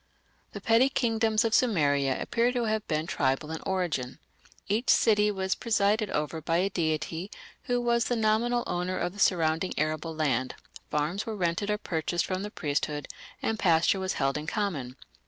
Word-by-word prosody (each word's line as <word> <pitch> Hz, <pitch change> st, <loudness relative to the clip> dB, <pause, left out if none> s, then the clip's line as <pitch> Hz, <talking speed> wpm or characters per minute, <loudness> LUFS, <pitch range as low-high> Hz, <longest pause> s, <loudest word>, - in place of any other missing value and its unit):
The -, -, -7 dB
petty 230 Hz, +4 st, +4 dB
kingdoms 225 Hz, -3 st, +1 dB
of 225 Hz, -, 0 dB
Sumeria 145 Hz, -, +2 dB
appear 240 Hz, +1 st, +1 dB
to 245 Hz, -2 st, 0 dB
have 220 Hz, -1 st, -1 dB
been 155 Hz, 0 st, -1 dB
tribal 140 Hz, 0 st, -1 dB
in 160 Hz, -, -5 dB
origin. 175 Hz, -10 st, -2 dB, 0.5 s
Each 220 Hz, +5 st, 0 dB
city 210 Hz, -1 st, +4 dB
was 190 Hz, -2 st, -1 dB
presided 215 Hz, -1 st, +1 dB
over 150 Hz, +2 st, -2 dB
by 165 Hz, +2 st, 0 dB
a 190 Hz, +3 st, +1 dB
deity 160 Hz, +2 st, -2 dB, 0.4 s
who 245 Hz, 0 st, +1 dB
was 235 Hz, -1 st, +1 dB
the 245 Hz, -, 0 dB
nominal 230 Hz, +2 st, +1 dB
owner 180 Hz, +1 st, -2 dB
of 175 Hz, -, -2 dB
the 205 Hz, -, -12 dB
surrounding 165 Hz, -1 st, +1 dB
arable 155 Hz, +1 st, -1 dB
land, 130 Hz, -5 st, 0 dB, 0.3 s
farms 155 Hz, +9 st, -1 dB
were 220 Hz, -, -3 dB
rented 175 Hz, +3 st, -1 dB
or 210 Hz, -, +1 dB
purchased 170 Hz, -3 st, -1 dB
from 185 Hz, 0 st, -2 dB
the 205 Hz, -, -4 dB
priesthood, 145 Hz, -4 st, -2 dB, 0.3 s
and 225 Hz, -1 st, -1 dB
pasture 170 Hz, +1 st, +3 dB
was 190 Hz, 0 st, -1 dB
held 135 Hz, +2 st, 0 dB
in 150 Hz, -, -8 dB
common. 160 Hz, -, -2 dB
185 Hz, 175 wpm, -28 LUFS, 155-215 Hz, 0.5 s, petty